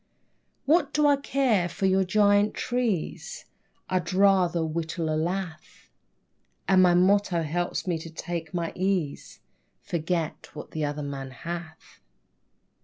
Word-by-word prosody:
What 295 -1 +3
do 300 0 +3
I 290 -1 +6
care 255 -10 +1
for 175 +3 -3
your 190 0 +3
giant 205 +2 +3
trees? 245 - -2 0.4
I'd 180 -2 -1
rather 185 -4 +3
whittle 160 0 -2
a - - 0
lath, 170 +1 -4 0.8
And 190 -1 +5
my 180 -1 +5
motto 185 -1 +3
helps 175 +3 -2
me 175 -3 -1
to 165 - -8
take 165 -1 -5
my 170 -2 -2
ease; 185 -6 -2 0.4
"Forget 165 -1 -3
what - - -8
the 155 - -3
other 145 0 -2
man 135 -1 -5
hath." 160 +4 -8
175 Hz, 130 wpm, -26 LUFS, 160-195 Hz, 0.8 s, I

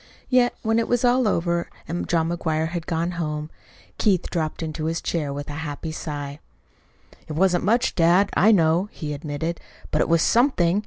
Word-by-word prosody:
Yet, 250 -1 +3
when 225 0 +2
it 230 - 0
was 245 0 +1
all 245 -1 +3
over, 170 -2 0 0.2
and 170 +2 -4
John 165 -1 +2
McGuire 160 -2 -1
had 170 -1 -5
gone 170 0 -1
home, 150 -1 -3 0.5
Keith 190 -5 +1
dropped 160 -1 -2
into 155 0 -4
his 165 +1 -1
chair 150 -4 -2
with 145 0 -5
a 145 - -6
happy 155 +1 -5
sigh. 145 -2 -5 0.9
"It - - -5
wasn't 180 +2 +2
much, 235 +5 +2
dad, 180 +3 +4
I 215 +4 +5
know," 175 0 +3
he 150 -3 -5
admitted, 150 +3 -4 0.3
"but - - +2
it - - 0
was 165 -1 +4
something. 205 -8 +3
170 Hz, 180 wpm, -23 LUFS, 155-190 Hz, 0.9 s, I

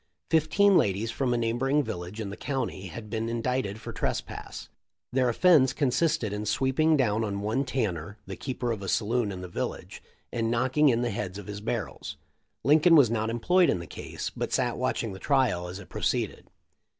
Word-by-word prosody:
Fifteen 180 +5 +4
ladies 105 +3 0
from 130 -3 -1
a 120 - +2
neighboring 125 +5 +1
village 90 0 -6
in 100 -3 -4
the - - -6
county 130 -9 -3
had 105 +6 -8
been 110 +1 -2
indicted 115 -3 -1
for - - -7
trespass. - - -4 0.5
Their 130 -1 +3
offence 135 -1 +5
con 140 -4 +1
sisted 125 -6 +1
in 105 +1 -4
sweeping 140 +7 +2
down 110 -4 +1
on 100 -2 -2
one 110 +7 0
Tanner, 105 - -2
the - - -6
keeper 125 -3 -3
of 110 -3 -3
a 95 - -4
saloon 115 +1 +1
in 95 -1 -6
the 90 - -6
village, 85 - -5 0.3
and 115 -1 0
knocking 130 +5 +3
in 120 -1 +2
the 120 - 0
heads 95 -1 -4
of 100 - -8
his 105 +1 -6
barrels. 110 -3 -4 0.5
Lincoln 155 +6 +6
was 135 -7 +6
not 110 -1 0
employed 175 +10 +3
in - - +2
the 85 - -7
case, - - -6
but - - -3
sat - - +1
watching - - -1
the 95 - -9
trial 125 -11 +1
as 90 +1 -6
it 100 - -11
pro - - -7
ceeded. - - -1
115 Hz, 200 wpm, -27 LUFS, 105-135 Hz, 0.5 s, Lincoln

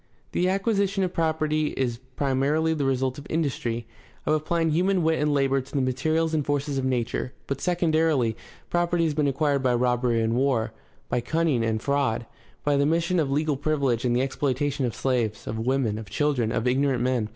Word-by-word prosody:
The 180 +1 +1
acquisition 195 0 +1
of 180 -1 -2
property 155 -2 0
is 120 -3 -1 0.2
primarily 145 +4 +1
the 145 -3 -1
result 130 0 0
of 145 - -11
industry, 125 -7 -1 0.4
of 155 - +2
applying 160 +1 +1
human 180 +3 +2
wit 160 0 +2
and 150 0 +2
labor 135 -1 +2
to 130 - -15
the - - +2
materials 155 +6 0
and 155 -2 +1
forces 145 0 -1
of 130 - -2
nature; 125 0 -1
but, 140 0 -4
secondarily, 160 -9 +2 0.4
property 175 0 +1
has 160 -2 +1
been 145 -1 +1
acquired 140 0 +1
by 125 -2 +2
robbery 125 -1 +1
and 115 0 +1
war, 120 -3 +1 0.3
by 125 - 0
cunning 155 -2 +1
and 110 -1 -1
fraud, 140 -5 0 0.4
by 145 -1 +2
the 140 - +3
mission 170 +3 +1
of 150 -4 +1
legal 150 +1 +1
privilege 140 -5 0
and 120 -1 +1
the 125 - +2
exploitation 135 0 -1
of 115 - -5
slaves, 120 -5 -1
of 110 - -4
women, 120 -3 0
of 110 -3 -9
children, 125 -1 0
of 115 +1 -1
ignorant 130 -1 +2
men. 125 -4 0
140 Hz, 190 wpm, -25 LUFS, 125-155 Hz, 0.4 s, the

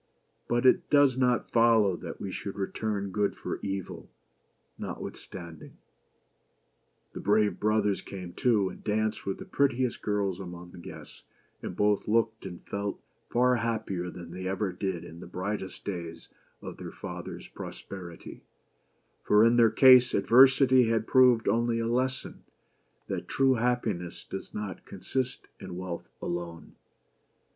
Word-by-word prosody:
But 120 +1 +1
it 175 +7 +4
does 145 -3 +5
not 125 -2 +1
follow 115 -5 +4
that - - -8
we 95 - -5
should 100 - -5
return 100 0 -3
good 100 +1 0
for - - -5
evil, 95 -2 -5 0.7
notwith - - -5
standing! 85 -4 -11 1.4
The - - -6
brave 105 +1 +2
brothers 105 -2 +1
came 90 -3 -8
too, 105 -6 +2
and - - -12
danced 110 0 -1
with 95 - -1
the - - -9
prettiest 130 -3 0
girls 100 -3 -1
among 90 -2 -8
the 90 - -12
guests; - - -11 0.4
and - - -6
both 105 -1 +1
looked 110 -1 +1
and 90 -2 -10
felt 100 0 -3 0.3
far 125 +1 +3
happier 110 -6 -2
than 85 -1 -9
they 95 +1 -5
ever 95 +1 -1
did 90 -1 -3
in 85 - -11
the 90 - -9
brightest 95 +2 -5
days 85 -4 -6 0.3
of - - -7
their - - -7
father's - - -7
pros - - -8
perity; 90 -4 -9 0.8
for 105 +2 +5
in 115 +1 +4
their 115 -2 +6
case 125 +2 +7
adversity 130 +2 +6
had 115 -1 +1
proved 125 -3 +5
only 115 +2 +2
a 115 - -1
lesson, 130 +2 -2 0.6
that - - -4
true 135 -1 +3
happiness 110 -8 -1
does 95 - -7
not 105 -2 -6
consist 125 +7 -4
in 90 - -7
wealth 90 -2 -6
alone. 85 -1 -5
105 Hz, 145 wpm, -28 LUFS, 95-120 Hz, 1.4 s, case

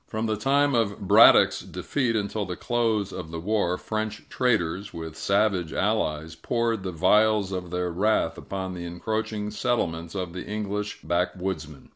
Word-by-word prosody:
From 110 0 -3
the 110 -1 0
time 140 +6 +2
of 100 -4 0
Braddock's - - +7
defeat 125 -5 -2
until 105 0 -1
the 90 -2 -4
close 115 -4 0
of 80 - -6
the 80 0 -5
war, 90 -1 0
French 110 +1 -4
traders, 100 -6 0
with 80 -1 -6
savage 100 -3 +1
allies, 80 -7 0
poured 115 +4 -1
the 95 -1 -4
vials 105 +3 +3
of 90 -2 -4
their 90 0 -2
wrath 105 +6 +1
upon 95 -1 -5
the 90 -1 -6
encroaching 105 +4 -3
settlements 85 -8 -1
of 90 -3 -3
the 90 - -5
English 105 -2 -4
backwoodsmen. 85 -2 -3
100 Hz, 155 wpm, -26 LUFS, 85-110 Hz, -, Braddock's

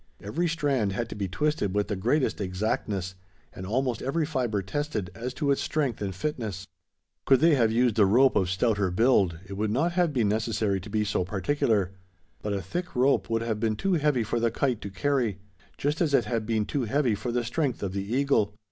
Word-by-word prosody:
Every 160 - -1
strand 140 -11 0
had 115 +3 -3
to - - -6
be 100 -2 -2
twisted 105 - -1
with 105 0 +1
the 105 - -2
greatest 120 +6 0
exactness; 95 -1 -2 0.4
and 95 - -7
almost 125 +1 0
every 150 +4 0
fibre 125 -9 -1
tested, 110 -2 -3
as 120 +3 -5
to 145 -3 +1
its 140 - +1
strength 140 -8 -1
and 95 -3 -3
fitness. 110 - -4 0.6
Could 135 -2 +6
they 165 +1 +5
have 115 -5 +3
used 115 -1 +2
a 100 - +7
rope 130 +6 +4
of 95 -2 +2
stouter 100 0 +1
build, 95 -4 +3
it 100 - -7
would 105 +1 0
not 145 +11 +1
have 175 -2 +2
been 120 -7 +1
necessary 105 -2 0
to 105 - -10
be 105 +1 0
so 100 -3 0
particular; 100 0 0 0.5
but 105 - -3
a 100 -2 -2
thick 175 - -5
rope 125 -6 +2
would 115 0 0
have 110 -2 -2
been 110 -1 0
too 190 - 0
heavy 150 -7 +2
for 115 +2 -1
the 115 0 +2
kite 120 0 -1
to 100 - -5
carry 120 0 0 0.4
just 145 +4 -1
as 150 -5 +3
it 120 - +3
had 110 -1 -2
been 110 -2 +1
too 135 0 -2
heavy 130 +1 +1
for 120 +4 -3
the 120 0 0
strength 130 0 -1
of 95 -2 -2
the 100 0 -2
eagle. 125 -6 +2
115 Hz, 215 wpm, -27 LUFS, 100-140 Hz, 0.6 s, a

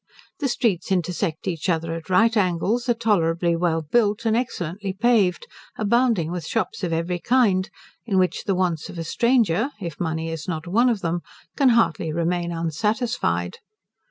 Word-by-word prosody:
The 290 - 0
streets 210 -8 0
intersect 180 -1 -1
each 175 0 -2
other 165 -1 0
at 165 +1 -7
right 225 +5 +4
angles, 205 +5 0
are 240 - +3
tolerably 170 -6 +1
well 165 -1 0
built, 210 +5 +1
and 225 -1 +2
excellently 195 -5 -3
paved, 205 -4 +2 0.3
abounding 215 -6 +2
with 175 -2 -4
shops 225 -3 -2
of 175 - -1
every 170 +2 -1
kind, 210 -5 +2 0.4
in 195 -4 +1
which 185 -1 +1
the 195 - +1
wants 175 -4 -1
of - - -9
a 165 - -3
stranger, 235 - +2
if 170 -6 -6
money 160 -1 -2
is 165 +1 -6
not 160 -2 -3
one 230 +8 +3
of 220 -5 -1
them, 170 +1 -1 0.3
can 275 -3 +4
hardly 225 -9 +2
remain 170 +1 -1
unsatisfied. 165 - -1
180 Hz, 165 wpm, -23 LUFS, 165-225 Hz, 0.4 s, right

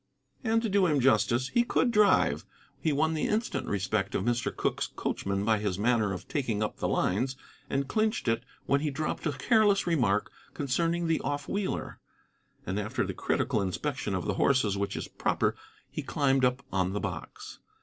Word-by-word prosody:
And, 225 -1 +2
to - - +1
do 195 -2 +3
him 150 -3 +2
justice, 130 -1 +3
he 240 - +3
could 240 +1 +2
drive. 210 -3 +4 0.4
He 160 - +1
won 160 +3 +2
the 155 - 0
instant 220 +2 -1
respect 100 +1 -1
of - - 0
Mr. 120 0 0
Cooke's - - -1
coachman 100 +1 -2
by 110 -1 +3
his 100 -3 -1
manner 110 -1 +2
of 95 - -6
taking 120 -8 -1
up 105 - -3
the - - -1
lines, 125 +8 0 0.3
and 135 0 0
clinched 215 - 0
it 115 +1 +1 0.2
when 140 0 +2
he 155 - 0
dropped 155 +3 -2
a - - +1
careless 210 - +3
remark 120 - +1 0.2
concerning 165 +5 0
the 165 -1 +2
off 145 -1 -3
wheeler. 200 -1 -3 0.7
And 95 +3 -2
after 105 +1 -1
the - - -4
critical 105 - 0
inspection 95 -2 -2
of - - -2
the - - 0
horses 125 -8 +3
which 100 0 -2
is - - -4
proper - - 0 0.4
he - - -3
climbed 135 -2 +1
up 125 +2 +1
on 95 -1 +1
the 105 - -1
box. - - -6
135 Hz, 185 wpm, -29 LUFS, 105-165 Hz, 0.7 s, drive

